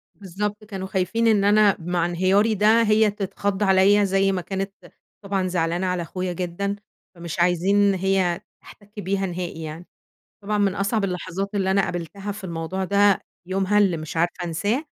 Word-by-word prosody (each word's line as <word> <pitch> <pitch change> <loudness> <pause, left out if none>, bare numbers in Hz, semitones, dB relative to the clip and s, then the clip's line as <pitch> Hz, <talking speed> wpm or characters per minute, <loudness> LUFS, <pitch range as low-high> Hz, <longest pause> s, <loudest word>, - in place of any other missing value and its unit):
بالضبط 205 +2 -4
كانوا 195 -3 -6
خايفين 190 +5 0
إن 210 -3 +4
أنا 205 -1 +5
مع 170 0 -1
انهياري 190 +5 +2
ده 215 +3 +4
هي 215 -1 +3
تتخض 200 0 -2
عليَّ 195 +1 +5
زي 195 0 +2
ما 185 -2 -2
كانت 195 +2 -4 0.5
طبعًا 195 -2 -1
زعلانة 175 +1 -1
على 180 -1 -1
أخويا 180 +1 -4
جدًا، 185 +3 -3 0.4
فمش 170 0 -6
عايزين 175 +3 +2
إن 200 -1 +4
هي 190 -1 0 0.2
تحتك 205 0 -14
بيها 195 +1 -1
نهائي 175 -2 -5
يعني. 160 +3 -7 0.6
طبعًا 210 +1 -1
من 200 -1 +1
أصعب 200 +1 0
اللحظات 185 +1 -3
اللي 190 -1 +1
أنا 195 0 +3
قابلتها 195 +4 -4
في 205 0 -9
الموضوع 170 +2 -4
ده 200 +1 +3 0.3
يومها 195 +2 +1
اللي 190 -5 +3
مش 155 +1 -6
عارفة 175 +1 0
أنساه 205 - -1
195 Hz, 170 wpm, -23 LUFS, 180-205 Hz, 0.6 s, أنا